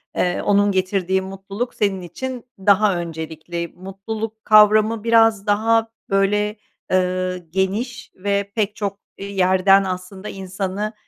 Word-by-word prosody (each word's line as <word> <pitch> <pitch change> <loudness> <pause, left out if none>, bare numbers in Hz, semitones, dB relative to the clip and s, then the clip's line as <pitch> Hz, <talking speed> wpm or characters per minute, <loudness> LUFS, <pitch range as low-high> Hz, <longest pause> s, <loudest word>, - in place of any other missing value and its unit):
eee, 180 0 0
onun 205 0 +3
getirdiği 190 0 0
mutluluk 195 +5 -5
senin 195 -3 0
için 250 +8 -6
daha 200 0 +4
öncelikli. 165 0 -5
Mutluluk 215 +4 -6
kavramı 215 +1 +5
biraz 225 -3 +4
daha, 225 +2 +2 0.2
böyle, 210 +2 +1 0.4
ııı, 185 0 +1
geniş 200 +6 -2
ve 200 +1 -1
pek 210 -1 0
çok, 200 -1 -4 0.2
iii, 200 0 -7
yerden 190 +2 +5
aslında 185 +2 -5
insanı, 195 +2 -4
195 Hz, 120 wpm, -21 LUFS, 185-215 Hz, 0.4 s, kavramı